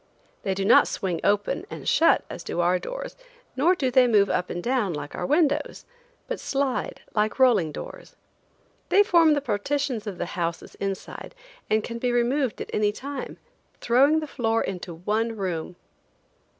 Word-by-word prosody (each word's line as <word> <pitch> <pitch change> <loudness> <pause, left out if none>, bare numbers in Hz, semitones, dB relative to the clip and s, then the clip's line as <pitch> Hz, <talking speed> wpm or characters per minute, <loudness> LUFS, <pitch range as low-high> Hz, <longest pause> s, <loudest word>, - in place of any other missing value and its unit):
They 190 -1 -1
do 195 0 -2
not - - +6
swing 180 -4 -2
open 205 0 0
and - - -8
shut 330 - +4
as - - -8
do - - -4
our 175 +1 +2
doors, - - -6 0.4
nor 325 +8 +3
do 265 -7 -1
they 250 0 +5
move 205 -4 +3
up 180 - -1
and 175 - -4
down 240 -7 0
like 145 0 -6
our - - -3
windows, 300 -1 +1 0.4
but - - -4
slide 275 -2 -2
like 210 -1 0
rolling 230 - +4
doors. - - -9 0.7
They 405 - +6
form 335 -7 +5
the 285 - -1
partitions 250 0 -2
of 195 -3 -5
the - - -2
houses 170 -1 -3
inside 195 - -5 0.3
and 215 0 +2
can 235 0 -5
be 245 +1 0
removed 245 +1 0
at - - -6
any 210 -1 +2
time, 275 +5 -7 0.4
throwing 280 +6 +4
the - - -3
floor 225 -5 0
into 180 -2 -5
one 220 +6 -1
room. 180 -3 -3
230 Hz, 170 wpm, -25 LUFS, 195-280 Hz, 0.7 s, not